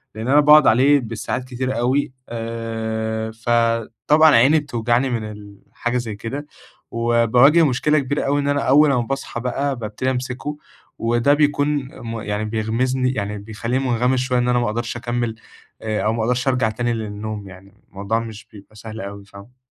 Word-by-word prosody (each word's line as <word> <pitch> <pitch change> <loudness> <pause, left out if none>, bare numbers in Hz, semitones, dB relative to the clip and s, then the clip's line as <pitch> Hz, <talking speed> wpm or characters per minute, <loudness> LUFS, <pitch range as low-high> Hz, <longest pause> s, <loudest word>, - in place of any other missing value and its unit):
لإن 110 +3 -5
أنا 145 +3 +5
باقعد 150 0 +7
عليه 135 +5 +5
بالساعات 115 +2 -4
كتير 130 0 -3
أوي، 130 +3 +1 0.2
آآ، 110 -1 -4
فطبعًا 115 +6 +2
عيني 140 +7 +5
بتوجعني 120 -1 0
من 115 -3 -2
ال 105 -1 -12 0.2
حاجة 120 +1 -2
زي 115 -4 -4
كده، 135 +8 -6 0.5
وباواجه 120 +7 +4
مشكلة 150 +3 +2
كبيرة 140 +2 -2
أوي 145 +1 +1
إن 140 - -2
أنا 145 0 +1
أول 145 +2 +5
امَّا 125 -3 +2
باصحى 135 -1 -4
بقى 135 +3 -1
بابتدي 120 +3 -3
امسكه، 130 +3 -4 0.4
وده 120 +5 +2
بيكون 145 -1 +2 0.3
م 115 -1 -5
يعني 105 +1 -3
بيغمِسني 125 +4 0
يعني 105 -3 -3
بيخليني 115 +5 -3
مُنغمِس 125 +2 +1
شوية 125 -1 0
إن 120 - 0
أنا 125 0 +3
ما 120 - 0
اقدرش 115 +2 -3
أكمِّل 120 -1 -2 0.5
أ 110 -1 -2
أو 110 - +1
ما 115 -1 -1
اقدرش 125 +2 0
ارجع 125 -4 +2
تاني 120 +2 -2
للنوم 105 -1 -5
يعني، 95 +1 -15 0.2
الموضوع 100 +3 -2
مش 115 -1 -8
بيبقى 105 +1 -15
سهل 110 0 -8
أوي 100 0 -8
فاهم؟ 100 +6 -15
120 Hz, 170 wpm, -21 LUFS, 110-130 Hz, 0.5 s, باقعد